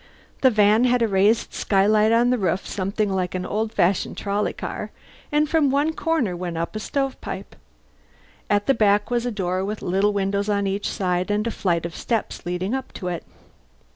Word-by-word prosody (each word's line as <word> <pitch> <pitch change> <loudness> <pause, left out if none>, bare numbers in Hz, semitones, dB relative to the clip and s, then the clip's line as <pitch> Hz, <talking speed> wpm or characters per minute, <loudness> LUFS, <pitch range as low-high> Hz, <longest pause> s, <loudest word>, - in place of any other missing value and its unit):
The 260 - +6
van 215 +1 +4
had 245 -1 +3
a - - +3
raised 205 +3 +2
skylight 210 +2 +3
on 240 +2 +4
the 250 - +1
roof, 185 -1 0
something 200 +2 -1
like 185 -1 -1
an 185 - -2
old 215 +1 -2
fashioned 180 -1 +1
trolley 205 +1 -1
car; - - -5 0.4
and 300 +1 +2
from 305 -2 +3
one 290 +4 +1
corner 315 - 0
went 175 -1 -4
up 170 +5 -3
a - - -2
stove 270 +3 -2
pipe. - - -7 0.9
At 205 0 +2
the 275 - +4
back 205 -1 +2
was 240 0 0
a - - -1
door 185 -3 -1
with 210 +2 -4
little 195 +3 +2
windows 200 +1 -1
on 200 -1 +1
each 195 +1 -1
side 180 -1 -1
and 210 +1 0
a 230 - -1
flight 170 -5 0
of 170 - -6
steps 225 -6 -3
leading 180 +5 -2
up 265 0 -3
to 180 - -4
it. 175 -2 -4
205 Hz, 200 wpm, -23 LUFS, 190-230 Hz, 0.9 s, The